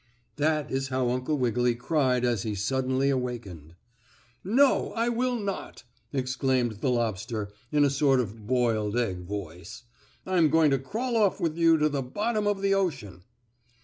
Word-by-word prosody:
That 150 0 0
is 135 0 -1
how 130 -2 0
Uncle 130 +4 -1
Wiggily 125 -1 +1
cried 125 -1 +1
as 120 -4 0
he 105 0 -3
suddenly 130 +6 0
awakened. 115 - -5 0.7
"No, 260 +8 +3
I 230 +1 0
will 245 +1 0
not!" 200 -2 -5 0.3
exclaimed 130 -3 0
the 135 - +1
lobster 110 -3 -2 0.2
in 145 -1 +4
a 140 - +2
sort 140 -1 +3
of 115 -6 -1
a - - -14
boiled 115 -1 0
egg 95 -7 -1
voice. 90 0 -7 0.4
"I'm 175 -4 +3
going 160 -1 +4
to 135 - +2
crawl 230 - -3
off 210 -4 +2
with 160 -2 -1
you 165 -1 +4
to 150 0 +2
the 145 -2 -2
bottom 210 - -1
of 200 -1 -1
the 195 0 +3
ocean!" 135 - -2
130 Hz, 165 wpm, -27 LUFS, 120-165 Hz, 0.7 s, in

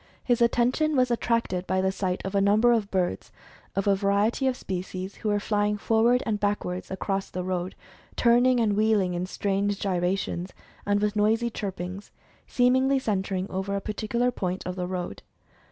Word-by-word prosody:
His 245 -2 +1
at 235 0 +5
tention 260 +6 +1
was 255 -2 +3
attracted 230 -6 0
by 185 0 +1
the 190 0 +1
sight 185 -1 -2
of 190 - -4
a 200 - +3
number 215 +4 +4
of 220 -4 +1
birds, 185 -3 -1 0.4
of 195 - 0
a 200 -1 +4
variety 200 +6 +1
of 255 -1 0
species, 185 +1 -5
who 215 - -2
were 205 0 +2
flying 210 0 0
forward 230 +4 +2
and 210 -2 -1
backward 205 -3 -1
across 195 0 -2
the 180 - -4
road, 185 0 -3 0.4
turning 245 +1 +4
and 215 -3 +2
wheeling 210 -4 +2
in 175 +1 -2
strange 200 +1 -1
gyrations, 180 -1 -1 0.3
and 205 0 +2
with 210 0 0
noisy 225 +3 +2
chirpings, 190 -1 -5 0.4
seemingly 260 +2 +3
centering 195 -5 -1
over 190 +1 -2
a - - 0
particular 220 +4 -1
point 185 -5 -3
of 180 - -4
the 180 -1 -3
road. 180 - -4
205 Hz, 175 wpm, -26 LUFS, 185-230 Hz, 0.4 s, at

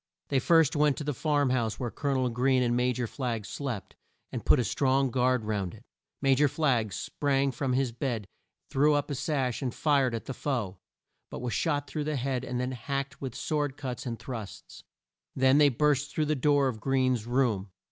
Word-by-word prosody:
They 135 - +2
first 160 +1 +4
went 150 -1 +3
to - - -4
the 150 0 -1
farm 145 -1 +1
house 115 -4 0
where 120 -3 -3
Col 145 -2 -2
o 130 - +1
nel 125 - +1
Greene 130 +2 +2
and 120 -1 +1
Ma 125 +1 +2
jor 125 0 -2
Flagg 115 -3 -3
slept, 125 -7 -5 0.4
and - - -4
put - - +5
a - - +2
strong 135 +3 +1
guard 125 -2 +2
round 100 -4 -2
it. 110 - -16 0.4
Ma 135 -1 +5
jor 145 +3 +4
Flagg 130 -7 +1
sprang 140 +5 0
from 130 -1 -2
his 130 -1 +1
bed, 115 -3 -3 0.5
threw 145 +2 +4
up 145 +1 -1
the - - -1
sash, 135 -3 -1
and 130 -3 -3
fired 140 -5 +2
at 115 - -5
the 135 - -4
foe, 115 -10 -3 0.5
but - - -6
was 125 -1 -3
shot 145 -4 0
through 150 -1 -4
the 155 0 -1
head 130 -1 -1
and 125 -1 -3
then 125 +1 -1
hacked 135 +1 -4
with 130 -3 -5
sword 145 -3 -1
cuts 130 -2 -5
and 115 -1 -3
thrusts. 115 -6 -8 0.5
They 130 0 +4
then 145 -1 +5
burst 150 +2 +2
through 155 - 0
the 155 +1 +1
door 145 0 +3
of 120 -4 -3
Greene's 130 -3 +1
room. 120 -6 +1
130 Hz, 210 wpm, -29 LUFS, 120-145 Hz, 0.5 s, put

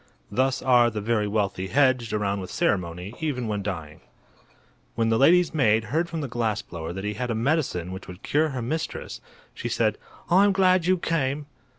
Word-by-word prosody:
Thus 130 +1 +1
are 120 -2 +5
the 110 -2 -4
very 105 0 0
wealthy 100 -3 -1
hedged 130 -1 +2
around 100 -2 -1
with 90 - -7
ceremony, 90 +1 -1
even 140 -7 -2
when 105 -1 -2
dying. 85 -6 -6 0.9
When 115 0 +1
the 115 - +2
lady's 175 +5 +5
maid 115 -7 +3
heard 170 +2 +1
from 165 -2 -4
the 140 - -3
glass 115 -3 -1
blower 80 -1 -6
that 95 +2 -6
he 105 0 -2
had 125 +4 -4
a 115 - 0
medicine 115 - 0
which 95 +1 -8
would 90 +1 -11
cure 155 +2 +1
her 130 -4 -4
mistress, 155 +7 -4 0.3
she - - -5
said: - - 0 0.3
"I'm 195 +3 +5
glad 185 -2 +3
you 185 0 +4
came." 150 -4 -1
120 Hz, 190 wpm, -25 LUFS, 100-150 Hz, 0.9 s, are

